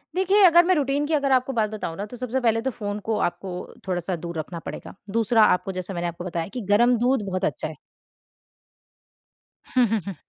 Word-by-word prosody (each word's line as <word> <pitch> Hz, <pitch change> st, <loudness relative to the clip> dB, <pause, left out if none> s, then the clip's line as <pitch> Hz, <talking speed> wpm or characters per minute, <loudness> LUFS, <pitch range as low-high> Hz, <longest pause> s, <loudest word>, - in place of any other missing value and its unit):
देखिए 385 Hz, +3 st, +3 dB
अगर 345 Hz, 0 st, +7 dB
मैं 370 Hz, +1 st, +3 dB
रूटीन 285 Hz, -1 st, 0 dB
की 320 Hz, -, -1 dB
अगर 280 Hz, -3 st, +1 dB
आपको 260 Hz, +1 st, +2 dB
बात 220 Hz, -2 st, +1 dB
बताऊँ 205 Hz, -6 st, -5 dB
ना, 200 Hz, -, -3 dB
तो 240 Hz, +4 st, -10 dB
सबसे 255 Hz, +1 st, -2 dB
पहले 225 Hz, -2 st, +2 dB
तो 265 Hz, +3 st, -1 dB
फ़ोन 205 Hz, -3 st, -4 dB
को 215 Hz, -, +1 dB
आपको 185 Hz, +2 st, -2 dB, 0.4 s
थोड़ा-सा 180 Hz, 0 st, -1 dB
दूर 170 Hz, 0 st, -6 dB
रखना 165 Hz, +2 st, -5 dB
पड़ेगा। -, -, -7 dB, 0.2 s
दूसरा, 230 Hz, +1 st, +3 dB
आपको 180 Hz, -2 st, +2 dB
जैसे 185 Hz, +1 st, -5 dB
मैंने 175 Hz, -1 st, -2 dB
आपको 170 Hz, +1 st, -6 dB
बताया 170 Hz, -2 st, -3 dB
कि 250 Hz, -, -4 dB
गरम 240 Hz, +4 st, +4 dB
दूध 250 Hz, +2 st, +2 dB
बहुत 185 Hz, -1 st, -2 dB
अच्छा -, -, -2 dB
है। -, -, -8 dB, 2.0 s
हुँ, 250 Hz, -1 st, +5 dB
हुँ, 220 Hz, +1 st, 0 dB
हुँ। 195 Hz, -, -5 dB
220 Hz, 210 wpm, -24 LUFS, 185-255 Hz, 2.0 s, अगर